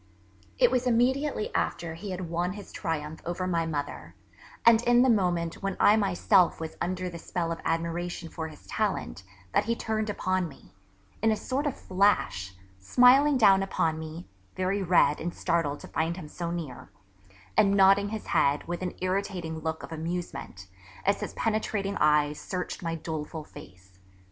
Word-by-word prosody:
It - - +5
was 255 0 +1
immediately 250 +1 +1
after 170 -2 -1
he 185 +5 -7
had 185 -1 -4
won 175 +2 -1
his 205 0 -10
triumph 160 -3 -4
over 175 +2 -3
my 170 -2 0
mother, 145 -3 -5 0.5
and 230 -1 +7
in 240 +1 +5
the 260 - +5
moment 175 -5 0
when 195 -1 -2
I 210 - +6
myself 195 -2 +3
was 160 -1 -6
under 185 +1 -2
the 170 -1 -7
spell 165 0 -3
of 165 - -4
admiration 170 +1 -2
for 160 0 -5
his 155 -1 -14
talent, - - -2 0.3
that - - +3
he 230 +1 0
turned 220 -2 -2
upon 185 -3 0
me, 140 - -16 0.5
in 225 - +3
a - - +2
sort 275 +6 -2
of 285 - -2
flash, 185 - +1 0.2
smiling 255 - +5
down 195 -5 +6
upon 165 -4 0
me 160 +2 -8 0.3
(very 185 +2 0
red 175 -4 +3
and 170 +1 -4
startled 165 -5 0
to - - -9
find 165 +2 -1
him 155 - -7
so 170 +3 -5
near), 165 -7 -6 0.7
and 200 -2 +4
nodding 195 +1 +5
his 220 0 -5
head 140 +1 +1
with 175 +1 -4
an 180 -1 -3
irritating 185 -3 -2
look 160 0 -4
of - - -9
amusement 165 - -5 0.4
as 200 +1 +2
his - - -5
penetrating 215 -2 -1
eyes 150 0 +3
searched 180 -1 -4
my 165 -2 -2
doleful 160 -1 -5
face. 95 -7 -15
175 Hz, 170 wpm, -28 LUFS, 160-200 Hz, 0.7 s, and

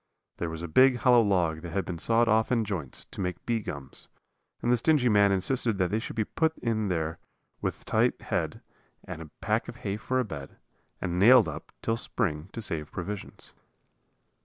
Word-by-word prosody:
There 85 - -2
was 80 +1 -6
a - - -3
big, 130 +10 +5
hollow 125 -1 +5
log 90 -7 +1
that 85 -1 -7
had 100 0 -1
been 85 -2 -5
sawed 115 +5 +3
off 110 +2 +3
in 115 -3 +2
joints 90 -10 -3
to - - -5
make 90 -1 -4
bee 115 -1 +1
gums; 70 -8 -8 0.5
and 120 - 0
the 125 - +4
stingy 130 0 +3
man 100 -2 +5
insisted 110 +3 +2
that 90 -1 +1
they 110 - +1
should 110 - -6
be 110 - +1
put 160 +6 0
in 110 -3 -1
there 80 -2 -2 0.4
with - - -3
a - - -31
tight - - +2
head, - - -2 0.4
and 85 -3 -7
a 80 - -9
pack 110 +1 0
of - - -7
hay 100 0 -1
for 130 +3 -1
a 125 - +1
bed, 70 -9 -8 0.4
and 90 -1 -2
nailed 120 +3 +7
up - - -7
till 115 0 0
spring 85 -9 -2
to 115 - -4
save 75 -6 -2
provisions. 100 +2 -4
105 Hz, 205 wpm, -28 LUFS, 85-115 Hz, 0.5 s, nailed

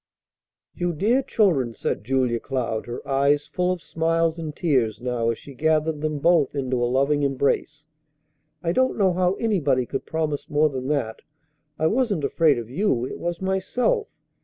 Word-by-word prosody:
"You 175 -1 -2
dear 220 - +2
children!" 165 - +1
said - - -3
Julia 125 -1 +1
Cloud, 120 -4 -3
her 120 - -7
eyes 140 +2 +2
full 180 0 -1
of 180 -3 -4
smiles 165 +1 0
and 155 -2 -5
tears 125 - +1
now 120 -2 -1
as 115 - -1
she 140 - -12
gathered 155 +2 +1
them 155 -1 -1
both 160 -1 +3
into 130 -3 -1
a 120 - +1
loving 140 +3 +2
embrace. 140 +2 0 0.8
"I 170 - +1
don't 260 +7 +1
know 190 -4 +3
how 180 +1 +2
anybody 150 - +1
could 135 - -5
promise 155 -3 -2
more 150 +1 +3
than 130 -2 -5
that. 135 -7 -2 0.6
I 160 - 0
wasn't 210 - +1
afraid 150 0 +3
of 115 -2 -5
you; 130 - 0
it - - -7
was 175 +1 -3
myself. 250 - 0
150 Hz, 170 wpm, -24 LUFS, 130-175 Hz, 0.8 s, both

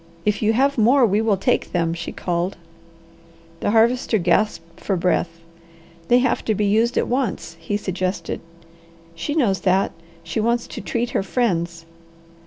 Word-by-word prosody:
"If 210 0 +1
you 220 0 +3
have 275 +2 +2
more, 245 +4 +5
we 210 0 +2
will 220 -3 +2
take - - 0
them," 165 -2 +1
she 165 0 -5
called. 175 +1 -2 1.0
The - - -1
Harvester 230 +2 +3
gasped 175 -2 0
for 195 - -1
breath. 175 0 +1 0.8
"They 245 - +5
have 250 -1 +1
to 220 - +1
be 210 - 0
used 225 +4 +2
at - - +1
once," 240 -9 -2
he 205 +5 -2
suggested. 185 -1 -3 0.7
"She 170 - -4
knows 220 -11 +2
that. 190 +1 +2 0.3
She 165 +6 -3
wants 235 +2 +1
to - - -8
treat 240 0 -2
her - - +1
friends." 170 -6 -1
210 Hz, 160 wpm, -22 LUFS, 180-235 Hz, 1.0 s, more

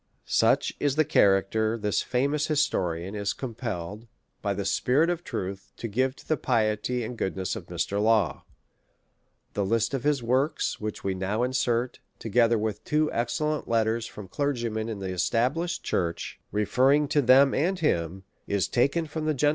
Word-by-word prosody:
Such - - +2
is 145 -2 +1
the 155 0 +3
character 110 -2 +3
this 105 -2 0
famous 140 +4 0
historian 95 - 0
is 100 -1 -1
com 130 -4 -6
pelled, 105 -2 -5 0.3
by 100 -2 -1
the 100 - -3
spirit 130 - +2
of 175 0 -3
truth, 95 - -5
to 115 - -4
give 130 +5 0
to - - -17
the 155 - +1
piety 115 0 0
and 120 +2 -5
goodness 95 -3 -2
of - - -8
Mr. 100 +1 -2
Law: 110 -4 +2 1.1
^the 100 - 0
list 115 +4 +1
of 135 -3 -2
his 145 -4 +1
works, 130 +6 0
which 105 -1 -5
we 95 - 0
now 95 +5 -1
insert, 125 -1 0 0.2
together 115 +1 +2
with 105 -1 -3
two 150 0 +1
excellent 150 +6 -1
letters 115 0 +1
from 105 -2 -10
clergymen 115 -3 -2
in 110 - -4
the 95 -1 -5
established 130 - 0
church, 85 -2 -2
referring 130 +8 +3
to 145 - +3
them 135 +2 +6
and 180 +6 +1
him, 90 - 0 0.2
is 100 -2 0
taken 140 +7 +1
from 155 +1 -5
the 155 -1 +1
Gent. 145 +2 +3
115 Hz, 170 wpm, -27 LUFS, 100-140 Hz, 1.1 s, them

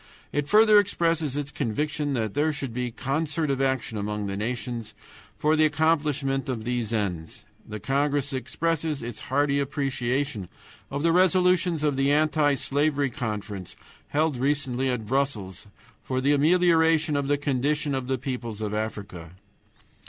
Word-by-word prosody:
It 145 -1 -1
further 215 0 +7
expresses 165 -7 0
its 145 0 -3
conviction 145 +3 -2
that 110 -5 -1
there 155 +2 +2
should 135 -5 -5
be 125 0 -2
concert 145 +5 -1
of 135 -1 -1
action 130 -5 -1
among 105 0 -3
the 100 -1 -3
nations 115 +1 -4 0.4
for 155 +1 +2
the 155 0 +4
accomplishment 150 -3 +1
of 120 -4 -3
these 120 -2 -2
ends. 90 -7 -3 0.2
The 105 0 -5
congress 140 +1 0
expresses 155 +3 -2
its 120 -2 -6
hearty 140 +1 +2
appreciation 135 - -2 0.4
of 140 +2 -3
the 165 - +4
resolutions 180 -2 +3
of 145 -3 +1
the 135 +1 +2
Anti 150 -1 +3
slavery 140 +1 0
Conference 105 -5 -5 0.3
held 155 -2 0
recently 135 -1 0
at 125 -3 -2
Brussels 105 -7 -2 0.3
for 130 -1 -2
the 140 +3 +3
amelioration 160 0 +3
of 140 -1 0
the 145 0 +2
condition 145 +1 0
of 130 -2 -2
the 130 0 0
peoples 120 -4 -5
of 105 -1 -3
Africa. 100 -6 -5
140 Hz, 150 wpm, -26 LUFS, 120-150 Hz, 0.4 s, further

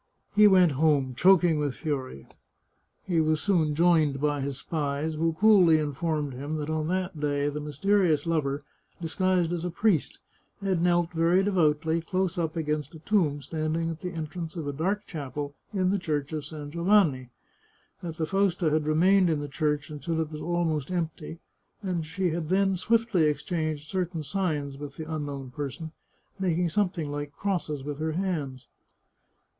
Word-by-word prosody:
He 210 0 +8
went 185 -4 +6
home, 140 -2 +2
choking 175 +2 +4
with 145 -3 -1
fury. 130 - -4 0.8
He 170 -4 +1
was 155 0 +1
soon 160 -7 +1
joined 160 -4 +3
by 145 0 0
his 135 -1 -3
spies, 150 0 -2
who 165 +1 0
coolly 185 -3 +6
informed 150 -1 -2
him 145 +5 -4
that 155 0 -3
on 155 -1 -1
that 185 -2 -2
day 145 -1 0
the 150 +1 -4
mysterious 155 +1 +1
lover, 145 -4 -1 0.4
disguised 175 0 +1
as 170 -1 -3
a 180 - -1
priest, 175 -2 +1 0.4
had 190 -4 0
knelt 175 -1 +2
very 170 +3 +3
de 205 - +1
voutly 160 -2 +2
close 185 0 -1
up 160 -1 -1
against 150 -1 -2
a - - -10
tomb 155 -7 +1
standing 160 +3 -2
at 165 - -8
the 180 - -3
entrance 165 0 -5
of 165 -3 -4
a 145 - -2
dark 195 +8 -1
chapel 145 -2 -5 0.2
in 185 -3 +1
the 200 - +1
Church 150 -3 -2
of 150 -2 -3
San 150 -1 -8
Giovanni; 170 - +2 0.7
that 165 -2 -6
the 160 - 0
Fausta 185 -2 +1
had 155 0 +1
remained 180 +4 +4
in 155 -2 +1
the 145 - -4
church 150 0 -1
until 150 +3 -3
it 160 -1 -2
was 150 - -6
almost 165 -4 -1
empty, 165 -2 -3 0.5
and 185 -3 -1
that 160 - -4
she 180 +1 -1
had 160 -1 -3
then 195 +1 +3
swiftly 220 -3 +2
exchanged 155 0 -2
certain 180 -3 -2
signs 145 -5 -2
with 145 -2 -8
the 160 - -5
unknown 140 -4 -5
person, 145 +4 -5 0.5
making 175 -2 +1
something 175 -5 -1
like 145 0 -4
crosses 170 -8 -2
with 145 0 -5
her 160 0 -1
hands. 155 -8 -3
160 Hz, 170 wpm, -27 LUFS, 150-180 Hz, 0.8 s, He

